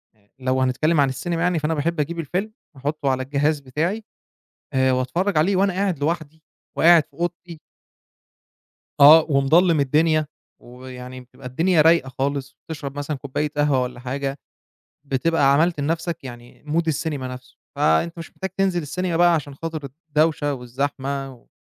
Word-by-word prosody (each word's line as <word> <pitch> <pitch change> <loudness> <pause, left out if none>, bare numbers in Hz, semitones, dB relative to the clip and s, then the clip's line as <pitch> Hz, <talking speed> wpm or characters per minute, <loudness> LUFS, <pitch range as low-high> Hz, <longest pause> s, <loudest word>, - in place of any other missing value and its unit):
آآ، 100 -1 -34
لو 130 0 0
هنتكلم 150 +5 +1
عن 140 - +3
السينما 165 +5 -3
يعني، 175 -2 +1
فأنا 150 +2 -1
باحب 160 +2 -1
أجيب 165 +3 -2
الفيلم 185 +8 -3 0.2
وأحطه 140 +1 -2
على 130 0 0
الجهاز 145 +2 0
بتاعي 160 - -2 0.7
آآ، 130 0 +3
وأتفرّج 150 +9 0
عليه 185 +5 +3
وأنا 195 0 +2
قاعد 190 -5 -1
لوحدي، 160 0 -3 0.3
وقاعد 170 -1 +6
في - - -41
أوضتي. 170 -1 -5 1.4
آه، 155 +3 +9
ومضلّم 155 +4 +4
الدنيا، 155 +3 +2 0.3
ويعني 125 +1 -10
بتبقى 125 +1 -14
الدنيا 160 +6 +2
رايقة 165 -4 +4
خالص، 140 0 -2
بتشرب 145 -3 -6
مثلًا 145 +1 -3
كوباية 140 +3 -3
قهوة 145 -3 +2
والّا 125 -1 -5
حاجة، 135 +2 -4 0.7
بتبقى 140 +1 +2
عملت 165 +2 +2
لنَفْسك 165 +2 -2
يعني 120 -1 -11
Mood 165 +3 +1
السينما 150 -3 -2
نَفْسه، 125 0 -10 0.2
فأنت 80 - +1
مش 165 -1 -8
محتاج 190 0 -5
تنزل 190 -3 +1
السينما 175 +3 -2
بقى 175 0 +5
عشان 145 -3 -2
خاطر 155 -2 -6 0.2
الدوشة 150 -1 +1
والزحمة 135 +2 -4
و 120 - -21
150 Hz, 155 wpm, -22 LUFS, 135-165 Hz, 1.4 s, آه